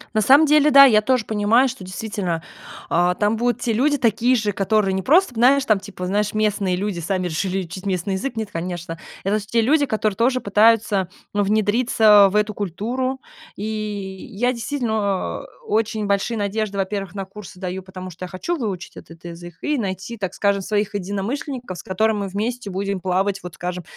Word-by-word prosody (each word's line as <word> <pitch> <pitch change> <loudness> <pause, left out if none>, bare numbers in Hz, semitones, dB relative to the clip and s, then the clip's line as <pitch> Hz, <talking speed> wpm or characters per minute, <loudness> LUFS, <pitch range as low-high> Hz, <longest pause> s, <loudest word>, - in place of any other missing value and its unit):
На 215 - +3
самом 275 +8 +6
деле, 300 0 +5
да, 275 -1 +9
я 215 -5 +5
тоже 250 0 +1
понимаю, 220 +4 +3
что 255 -4 -7
действительно, 185 -3 -4 0.5
э, 175 +1 +3
там 210 +1 +2
будут 240 +1 0
те 230 - 0
люди 290 +6 +2
такие 240 0 +2
же, 215 -3 0
которые 200 0 +1
не 190 - -1
просто, 315 - +3
знаешь, 260 +4 +4
там 215 -5 +3
типа, 195 -2 -7
знаешь, 205 +3 0
местные 205 -3 +1
люди 195 -1 -3
сами 185 +2 -2
решили 185 +3 -2
учить 185 +4 -8
местный 185 +1 -1
язык. 235 +7 -3
Нет, 220 -2 -3
конечно. 170 -1 -5 0.2
Это 205 +3 +1
те 220 +3 0
люди, 285 +4 +3
которые 215 -2 0
тоже 255 +4 +2
пытаются, 210 -3 +3 0.2
ну, 205 - +1
внедриться 215 0 +4
в - - -5
эту 210 0 +2
культуру. 240 +8 -3 0.3
И, 205 - -5 0.6
я 245 +3 0
действительно, 220 -6 -2
э, - - -23
очень 220 0 0
большие 200 +3 0
надежды, 205 0 -2
во-первых, 195 -1 -3
на 195 -1 -4
курсы 195 -1 -12
даю, 185 0 -4
потому, 185 0 -9
что 180 +2 -7
я - - -9
хочу 190 - -3
выучить 200 - -5
этот 165 +1 -13
язык 175 0 -9
и 300 -1 0
найти, 195 +2 -4
так 190 -3 -4
скажем, 200 -1 +1
своих 210 +1 -1
единомышленников, 205 +4 -4
с - - -9
которыми 220 +4 +1
мы 200 - -2
вместе 215 +4 -3
будем 195 0 -2
плавать, 190 +2 0
вот 180 -1 -9
скажем, 180 0 -5
205 Hz, 190 wpm, -21 LUFS, 190-230 Hz, 0.6 s, да